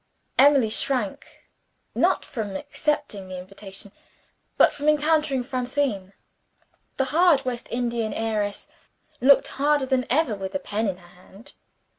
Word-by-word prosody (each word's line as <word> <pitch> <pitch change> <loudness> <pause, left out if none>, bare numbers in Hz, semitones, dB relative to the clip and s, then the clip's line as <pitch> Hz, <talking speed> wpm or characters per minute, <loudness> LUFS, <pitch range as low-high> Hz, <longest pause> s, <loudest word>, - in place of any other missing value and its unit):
Emily 270 -5 +5
shrank 245 -3 -2 0.7
not - - +2
from 210 -5 -5
accepting 290 -4 -2
the 185 - -6
invitation 195 +1 -10 0.7
but - - +5
from 290 +1 0
encountering 300 -3 +2
Francine. 250 -6 -2 0.8
The 270 - +1
hard 325 -5 +4
West 245 -2 -4
Indian 235 -2 -1
heiress 215 -2 -2 0.5
looked 275 +2 +6
harder 290 0 +1
than 260 -1 0
ever 285 -2 +2
with 195 +1 -6
a - - +1
pen 220 -4 -2
in 190 -2 -2
her 175 -1 -18
hand. 220 +10 -15
245 Hz, 130 wpm, -24 LUFS, 205-285 Hz, 0.8 s, looked